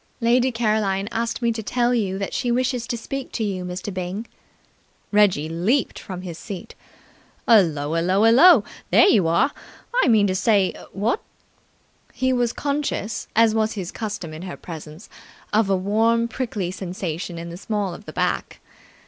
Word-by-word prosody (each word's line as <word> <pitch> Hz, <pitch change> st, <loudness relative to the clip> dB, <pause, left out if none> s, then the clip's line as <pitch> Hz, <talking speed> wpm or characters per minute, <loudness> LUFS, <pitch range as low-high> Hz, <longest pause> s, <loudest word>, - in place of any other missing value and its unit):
"Lady 245 Hz, +2 st, +3 dB
Caroline 215 Hz, -4 st, 0 dB
asked 235 Hz, +2 st, -2 dB
me 235 Hz, -, +3 dB
to 225 Hz, 0 st, -4 dB
tell 240 Hz, +3 st, +1 dB
you 200 Hz, -5 st, 0 dB
that 195 Hz, 0 st, -4 dB
she 245 Hz, -, -1 dB
wishes 250 Hz, -1 st, 0 dB
to 245 Hz, -1 st, -2 dB
speak 275 Hz, +3 st, -6 dB
to 225 Hz, -, -2 dB
you, 190 Hz, -3 st, -2 dB
Mr. 180 Hz, +2 st, -5 dB
Byng." 185 Hz, +4 st, -4 dB, 0.9 s
Reggie 205 Hz, -8 st, +3 dB
leaped 190 Hz, -, 0 dB
from 185 Hz, -1 st, -7 dB
his 170 Hz, -3 st, -7 dB
seat. 195 Hz, -4 st, -8 dB, 0.7 s
"Hullo 160 Hz, -10 st, +4 dB
ullo 175 Hz, +4 st, +1 dB
ullo! 270 Hz, -, +7 dB, 0.3 s
There -, -, +6 dB
you 195 Hz, -, +4 dB
are! 215 Hz, -, +3 dB, 0.5 s
I -, -, +3 dB
mean 220 Hz, -4 st, +5 dB
to 190 Hz, -, +1 dB
say, 200 Hz, -1 st, +2 dB, 0.2 s
what?" 215 Hz, -, -1 dB, 0.9 s
He 260 Hz, 0 st, +1 dB
was 245 Hz, -2 st, +1 dB
conscious, 280 Hz, -7 st, -2 dB
as 225 Hz, 0 st, +5 dB
was 220 Hz, 0 st, +1 dB
his 190 Hz, -5 st, -5 dB
custom 205 Hz, -7 st, -5 dB
in 155 Hz, -, -8 dB
her 180 Hz, -1 st, -7 dB
presence, 160 Hz, +2 st, -10 dB, 0.5 s
of 215 Hz, -1 st, +3 dB
a 195 Hz, -, +3 dB
warm, 225 Hz, +4 st, +2 dB
prickly 225 Hz, -7 st, -3 dB
sensation 180 Hz, -2 st, -5 dB
in 170 Hz, 0 st, -6 dB
the -, -, -7 dB
small 205 Hz, -2 st, -2 dB
of 210 Hz, -, -11 dB
the -, -, -9 dB
back. -, -, -2 dB
210 Hz, 165 wpm, -23 LUFS, 185-235 Hz, 0.9 s, ullo